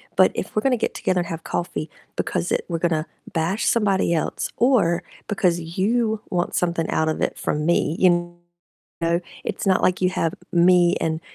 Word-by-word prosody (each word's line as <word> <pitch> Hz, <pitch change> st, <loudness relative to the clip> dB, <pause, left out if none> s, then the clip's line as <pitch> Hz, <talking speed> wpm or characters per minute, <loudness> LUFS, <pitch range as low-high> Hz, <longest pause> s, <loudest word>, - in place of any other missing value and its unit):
but -, -, +5 dB
if -, -, -5 dB
we're 215 Hz, -, +2 dB
gonna 260 Hz, 0 st, +2 dB
get 225 Hz, -, -2 dB
together 185 Hz, -1 st, 0 dB
and 170 Hz, -, -5 dB
have 165 Hz, -1 st, -6 dB
coffee 160 Hz, -3 st, -3 dB, 0.3 s
because 175 Hz, -1 st, -2 dB
it -, -, 0 dB
we're 170 Hz, -, -1 dB
gonna 160 Hz, -2 st, 0 dB, 0.3 s
bash 170 Hz, +6 st, 0 dB
somebody 200 Hz, -6 st, +2 dB
else 160 Hz, -, -1 dB
or 220 Hz, -8 st, +3 dB, 0.3 s
because 180 Hz, -4 st, +1 dB, 0.2 s
you 220 Hz, +2 st, +1 dB
want 175 Hz, -1 st, -1 dB
something 170 Hz, -2 st, 0 dB
out 160 Hz, 0 st, +1 dB
of 155 Hz, -, -2 dB
it -, -, 0 dB
from 150 Hz, 0 st, -2 dB
me, 165 Hz, -2 st, +2 dB
you 175 Hz, -1 st, +2 dB, 0.7 s
know, 170 Hz, +1 st, +2 dB, 0.2 s
it's -, -, -4 dB
not 190 Hz, -1 st, +3 dB
like 185 Hz, 0 st, +2 dB
you 180 Hz, -, +3 dB
have 165 Hz, -3 st, -1 dB, 0.2 s
me 175 Hz, 0 st, +5 dB
and 160 Hz, 0 st, -1 dB
175 Hz, 185 wpm, -23 LUFS, 165-190 Hz, 0.7 s, but